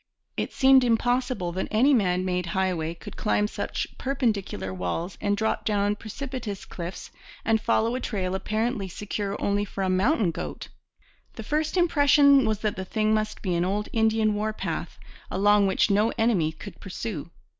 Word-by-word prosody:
It - - -2
seemed 265 -1 +5
impossible 245 -4 +1
that 185 +2 -3
any 250 +7 +4
man 185 -6 +2
made 180 -1 -1
highway 170 -4 0
could - - -10
climb 210 -1 +1
such - - -3
perpendicular 210 - -1
walls 95 - -3
and 205 0 +1
drop 220 +1 0
down 205 -1 +1
precipitous 230 -1 -6
cliffs 175 +1 -7 0.3
and 220 0 +2
follow 230 0 +1
a 255 - -1
trail 190 -7 -2
apparently 215 +2 -1
secure 200 +2 -4
only 200 0 +1
for 195 -1 -4
a 185 - +1
mountain 200 - +2
goat. - - -6 0.7
The 225 - -7
first 305 - -1
impression 285 -5 +5
was 215 -1 -1
that 215 -3 -1
the 190 - -3
thing 215 +3 +1
must 215 0 -2
be 185 -4 0
an 170 0 +1
old 205 +3 -1
Indian 220 -1 +2
war 215 +1 -1
path, - - -4 0.3
along 205 +1 +4
which 195 +2 +2
no 210 +3 +3
enemy 205 -9 +2
could 200 +5 -11
pursue. 190 -4 -5
210 Hz, 165 wpm, -26 LUFS, 190-230 Hz, 0.7 s, seemed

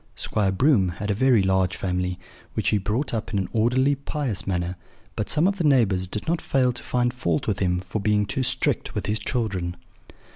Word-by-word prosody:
Squire 100 -3 0
Broom 105 -3 +3
had 105 +1 -2
a - - +2
very 120 -1 +4
large 95 -1 +2
family, 90 -1 -1 0.4
which - - +1
he 105 - +2
brought 110 +9 -2
up 110 - -3
in 105 - 0
an 95 - 0
orderly, 125 +5 +3
pious 140 -6 -3
manner; 90 -1 -1 0.4
but 105 - -3
some 155 +2 +2
of 195 0 -1
the - - +1
neighbours 110 -11 +3
did 105 +7 -5
not 165 +1 0
fail 130 -2 +2
to 125 - -7
find 120 -1 0
fault 85 -11 -1
with 105 -3 -1
him 90 -2 +1
for 95 +3 -4
being 105 0 +2
too 100 +7 -2
strict 130 - -1
with - - -2
his 105 +1 0
children. 100 -8 -2
105 Hz, 210 wpm, -24 LUFS, 95-125 Hz, 0.4 s, very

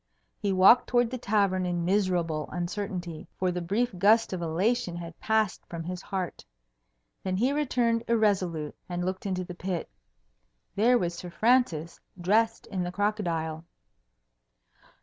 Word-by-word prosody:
He 200 -2 0
walked 190 +6 +6
towards 240 -1 +2
the 255 - -4
tavern 200 -4 +1
in 175 -1 -1
miserable 175 -6 0
uncertainty, 175 -2 -4
for 185 -1 +1
the 180 0 -3
brief 205 +6 0
gust 215 +2 +4
of 180 - -3
elation 175 +4 0
had 170 -1 -8
passed 220 -4 +1
from 165 -1 -6
his 180 +2 -5
heart. 190 -4 -4 0.8
Then 185 -1 -2
he 250 +7 +2
returned 240 -5 +1
irresolute, 190 -9 +1
and 175 0 -2
looked 185 +2 -3
into 185 -1 -1
the 180 - -8
pit. 180 -1 -4 0.8
There 235 +5 +4
was 175 -5 -1
Sir 175 +1 -7
Francis, 185 -7 +1 0.2
dressed 220 +5 +2
in 190 -3 -3
the 175 0 -2
crocodile. 170 -6 -1
185 Hz, 145 wpm, -28 LUFS, 175-220 Hz, 0.8 s, walked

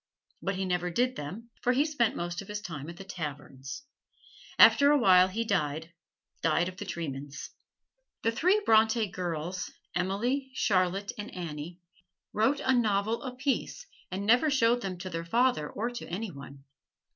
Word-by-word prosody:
But 195 0 -1
he 190 0 -2
never 180 -1 0
did 250 +8 +1
them, 200 +11 -7
for 250 - +2
he 280 +4 +3
spent 290 -8 +1
most 175 0 -3
of 200 - -11
his 210 0 -4
time 165 -7 -7
at 170 - -9
the 195 - -8
taverns. 145 - -7 0.7
After 285 0 +8
a 295 - +5
while 185 -7 +6
he 225 +5 -2
died 160 -4 -1 0.5
died 175 - +2
of 185 0 -7
the - - -6
tremens. 145 -3 -6 0.7
The 230 - +3
three 365 - +3
Bronte 220 +1 +4
girls, 180 -1 -4 0.2
Emily, 235 +10 -1
Charlotte 195 -2 +1
and 205 - -5
Annie, 170 0 -6 0.5
wrote 265 +7 +2
a 260 - +2
novel 220 -2 +1
apiece, 260 - -2 0.2
and 195 +2 -4
never 245 +8 +5
showed 245 -3 +3
them 190 -4 -4
to 185 +1 -6
their 165 0 -3
father 230 -4 +1
or 235 +4 -3
to 240 - -7
any 195 +4 -4
one. 140 -1 -11
195 Hz, 165 wpm, -29 LUFS, 170-235 Hz, 0.7 s, After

